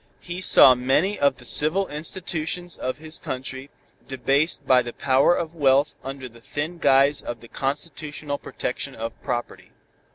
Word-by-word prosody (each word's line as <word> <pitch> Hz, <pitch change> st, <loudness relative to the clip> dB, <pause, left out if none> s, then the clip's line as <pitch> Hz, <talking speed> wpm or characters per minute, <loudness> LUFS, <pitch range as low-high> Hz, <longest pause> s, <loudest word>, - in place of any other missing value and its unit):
He 175 Hz, +1 st, -7 dB
saw 135 Hz, -7 st, +8 dB
many 135 Hz, +11 st, 0 dB
of 140 Hz, -1 st, +2 dB
the 125 Hz, -, -14 dB
civil 170 Hz, +10 st, +3 dB
institutions 165 Hz, +2 st, -4 dB
of 130 Hz, -, -4 dB
his 155 Hz, +1 st, -7 dB
country 130 Hz, +1 st, -6 dB, 0.4 s
debased 140 Hz, +3 st, 0 dB
by 130 Hz, -1 st, +5 dB
the 120 Hz, -1 st, -7 dB
power 135 Hz, +5 st, +3 dB
of 165 Hz, -1 st, -4 dB
wealth 140 Hz, -2 st, +2 dB
under 135 Hz, 0 st, -6 dB
the 115 Hz, -1 st, -17 dB
thin 155 Hz, +7 st, -5 dB
guise 140 Hz, 0 st, +4 dB
of 120 Hz, -1 st, -6 dB
the 115 Hz, -, -14 dB
constitutional 145 Hz, +2 st, -4 dB
protection 130 Hz, +2 st, -5 dB
of 115 Hz, +1 st, -5 dB
property. 120 Hz, -1 st, -5 dB
140 Hz, 155 wpm, -23 LUFS, 130-155 Hz, 0.4 s, saw